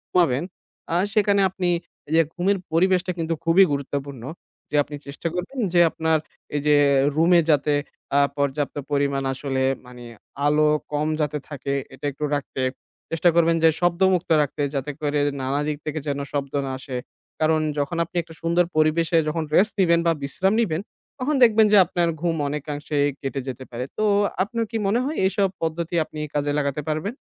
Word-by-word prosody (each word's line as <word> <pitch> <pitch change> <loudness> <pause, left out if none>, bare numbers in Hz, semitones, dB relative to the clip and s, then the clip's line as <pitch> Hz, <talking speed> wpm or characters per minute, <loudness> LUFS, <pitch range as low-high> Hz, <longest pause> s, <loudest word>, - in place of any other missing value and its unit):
ঘুমাবেন 150 -6 +3 0.5
আর 175 - +3
সেখানে 205 -2 +3
আপনি 180 -1 -2 0.4
এইযে 160 +1 +5
ঘুমের 195 +3 +1 0.2
পরিবেশটা 185 +1 +2
কিন্তু 165 0 -1
খুবই 165 +4 +6
গুরুত্বপূর্ণ। 140 -2 -4 0.5
যে - - -2
আপনি 145 - -8
চেষ্টা 140 +4 -5
করবেন 185 +10 -4
যে 175 - +5
আপনার 160 0 +1 0.4
এইযে 150 +1 +3 0.4
রুমে 170 +2 +5
যাতে 150 0 +3 0.4
আ - - +6 0.2
পর্যাপ্ত 140 0 -1 0.2
পরিমাণ 140 -1 +1
আসলে 135 0 -2 0.2
মানে 125 0 -12 0.4
আলো 150 +1 +4 0.2
কম 150 +1 0
যাতে 150 0 -1
থাকে 140 -1 -4 0.2
এটা 130 +2 -9
একটু 145 +3 -8
রাখতে। 140 -2 -4 0.5
চেষ্টা 165 +2 +3
করবেন 165 -1 +4
যে 165 - +8
শব্দমুক্ত 180 +1 +2
রাখতে 145 0 -2
যাতে 135 +2 -2
করে 145 -1 0 0.2
নানা 135 +2 -1
দিক 150 -1 -2
থেকে 155 0 -2
যেন 140 -1 -1
শব্দ 140 -2 -3
না 135 - -3
আসে। 130 -1 -5 0.4
কারণ 155 0 +3 0.2
যখন 145 +4 -2
আপনি 170 - -26
একটা 165 0 -14
সুন্দর 170 +1 +2
পরিবেশে 160 +2 +3
যখন 160 +1 -1
rest 210 +3 +4
নিবেন 170 -2 +4
বা 165 - +5
বিশ্রাম 190 +8 0
নিবেন 170 -6 -1 0.4
তখন 285 +4 0
দেখবেন 220 -2 +6
যে - - +8
আপনার 175 -1 0
ঘুম 170 -1 0
অনেকাংশে 150 +1 -4 0.2
কেটে 135 0 -3
যেতে 130 0 -5
পারে। 120 +1 -4
তো 215 - 0 0.4
আপনার 230 +3 -2
কি 225 - -1
মনে 225 +5 +2
হয় 305 +3 -3
এইসব 195 0 +2
পদ্ধতি 165 +1 -2
আপনি 155 - -9
কাজে 145 0 0
লাগাতে 140 0 -1
পারবেন? 155 +10 -2
155 Hz, 170 wpm, -23 LUFS, 145-175 Hz, 0.5 s, যে